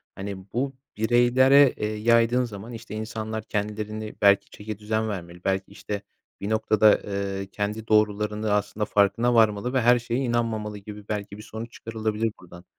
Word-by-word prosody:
hani, 100 Hz, 0 st, -5 dB, 0.2 s
bu 135 Hz, +3 st, -1 dB, 0.2 s
bireylere, 125 Hz, +4 st, +5 dB
eee, 105 Hz, -, -2 dB
yaydığın 115 Hz, +3 st, +3 dB
zaman, 110 Hz, +1 st, -8 dB
işte, 110 Hz, -2 st, -8 dB
insanlar 110 Hz, 0 st, -4 dB
kendilerini 105 Hz, 0 st, -4 dB
belki 100 Hz, -1 st, +5 dB
çeki 105 Hz, 0 st, -7 dB
düzen 110 Hz, +1 st, -1 dB
vermeli 90 Hz, -3 st, -7 dB
belki, 95 Hz, 0 st, -1 dB
işte, 100 Hz, 0 st, -5 dB, 0.4 s
bir 100 Hz, -, -3 dB
noktada, 110 Hz, -1 st, +4 dB
eee, 100 Hz, -1 st, -3 dB
kendi 105 Hz, +2 st, -3 dB
doğrularını, 105 Hz, 0 st, +1 dB
aslında, 105 Hz, +1 st, 0 dB
farkına 105 Hz, +5 st, +2 dB
varmalı 110 Hz, +2 st, +3 dB
ve 130 Hz, -, +2 dB
her 120 Hz, +1 st, +5 dB
şeye 120 Hz, +1 st, -2 dB
inanmamalı 115 Hz, -4 st, -1 dB
gibi 105 Hz, 0 st, -10 dB
belki 100 Hz, -1 st, -4 dB
bir 105 Hz, -, -10 dB
sonuç 110 Hz, +2 st, -7 dB
çıkarılabilir 110 Hz, -1 st, -2 dB
buradan. 85 Hz, 0 st, -14 dB
110 Hz, 155 wpm, -25 LUFS, 105-115 Hz, 0.4 s, bireylere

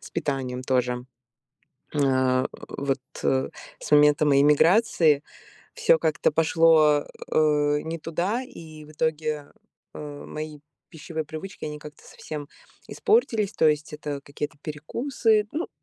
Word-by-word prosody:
с -, -, -12 dB
питанием 130 Hz, -3 st, -3 dB
тоже. 125 Hz, -1 st, -1 dB, 0.9 s
А, 130 Hz, -2 st, +2 dB, 0.2 s
вот, 140 Hz, 0 st, -2 dB, 0.2 s
э, 130 Hz, 0 st, +1 dB, 0.3 s
с -, -, -7 dB
момента 150 Hz, 0 st, +5 dB
моей 140 Hz, -1 st, +5 dB
миграции, 155 Hz, -1 st, +4 dB, 0.5 s
всё 160 Hz, -, +4 dB
как-то 155 Hz, -2 st, +1 dB
пошло, 160 Hz, -2 st, +4 dB, 0.3 s
э, 150 Hz, -1 st, +3 dB
не 165 Hz, +1 st, -4 dB
туда, 180 Hz, +10 st, -2 dB
и 160 Hz, -, -11 dB
в 150 Hz, -, -15 dB
итоге, 155 Hz, -2 st, -2 dB, 0.4 s
э, 145 Hz, -1 st, -8 dB
мои 155 Hz, 0 st, -6 dB, 0.3 s
пищевые 160 Hz, -1 st, -6 dB
привычки, 160 Hz, +5 st, -8 dB
они 150 Hz, 0 st, -6 dB
как-то 150 Hz, 0 st, -12 dB
совсем 150 Hz, -2 st, -8 dB, 0.4 s
испортились. 330 Hz, -, +1 dB
То 160 Hz, -, +4 dB
есть 150 Hz, 0 st, -1 dB
это 150 Hz, -2 st, -5 dB
какие-то 145 Hz, +2 st, -6 dB
перекусы, 215 Hz, -, 0 dB
ну, 325 Hz, +4 st, -3 dB
150 Hz, 125 wpm, -25 LUFS, 145-160 Hz, 0.9 s, момента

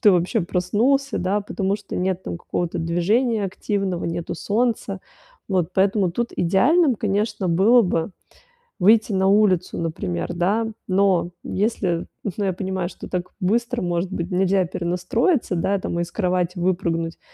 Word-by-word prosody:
ты 210 Hz, -, +6 dB
вообще 180 Hz, +5 st, +1 dB
проснулся, 220 Hz, +11 st, +1 dB
да, 195 Hz, +3 st, 0 dB
потому 195 Hz, -1 st, -2 dB
что 210 Hz, -, -8 dB
нет 185 Hz, 0 st, -1 dB
там 170 Hz, -, -5 dB
какого-то 175 Hz, -1 st, -3 dB
движения 205 Hz, +8 st, +1 dB
активного, 195 Hz, -1 st, -2 dB
нету 170 Hz, 0 st, -3 dB
солнца. 210 Hz, 0 st, -1 dB, 0.5 s
Вот, 185 Hz, -4 st, 0 dB
поэтому 195 Hz, -1 st, +2 dB
тут 235 Hz, +7 st, -2 dB
идеальным, 255 Hz, -, +3 dB
конечно, 205 Hz, -2 st, -1 dB
было 205 Hz, +8 st, +5 dB
бы 170 Hz, -2 st, -1 dB, 0.7 s
выйти 215 Hz, +3 st, +4 dB
на 190 Hz, 0 st, +2 dB
улицу, 195 Hz, -3 st, +3 dB
например, 90 Hz, -, -3 dB
да. 200 Hz, +6 st, +1 dB, 0.2 s
Но 185 Hz, -2 st, +2 dB
если, 190 Hz, -5 st, -1 dB, 0.2 s
ну, 205 Hz, -, -2 dB
я 190 Hz, -, 0 dB
понимаю, 185 Hz, -1 st, -3 dB
что -, -, -10 dB
так 180 Hz, -1 st, -3 dB
быстро, 235 Hz, +6 st, 0 dB
может 175 Hz, +1 st, -1 dB
быть, 175 Hz, 0 st, -4 dB
нельзя 190 Hz, +1 st, +2 dB
перенастроиться, 180 Hz, -, 0 dB
да, 195 Hz, +4 st, +1 dB
там, 170 Hz, -2 st, -3 dB
из 170 Hz, 0 st, -3 dB
кровати 180 Hz, -2 st, 0 dB
выпрыгнуть 170 Hz, -2 st, -1 dB
190 Hz, 145 wpm, -22 LUFS, 175-210 Hz, 0.7 s, ты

